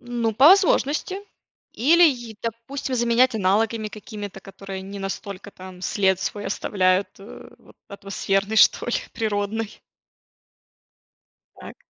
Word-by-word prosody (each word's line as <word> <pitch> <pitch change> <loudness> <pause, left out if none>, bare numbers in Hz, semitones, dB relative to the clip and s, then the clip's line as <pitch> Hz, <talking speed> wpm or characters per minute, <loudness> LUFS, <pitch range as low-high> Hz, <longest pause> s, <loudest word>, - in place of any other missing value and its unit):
Ну, 240 -2 -2
по 270 +8 +7
возможности 370 -2 +3 0.6
или 325 +9 +4
е 240 -5 -5
допустим, 235 +4 -4
заменять 240 +1 +3
аналогами 215 +2 +1
какими-то, 210 -2 -9
которые 195 0 -9
не 200 +1 -8
настолько 195 0 -6
там 185 -1 -12
след 190 -1 +1
свой 205 +2 -4
оставляют, 190 -1 +1
э, 200 +3 -12
вот - - -21
атмосферный 200 +1 -2
что - - +5
ли, 240 - 0 0.2
природный. 215 0 -3 1.8
Так. - - -10
215 Hz, 115 wpm, -23 LUFS, 195-235 Hz, 1.8 s, по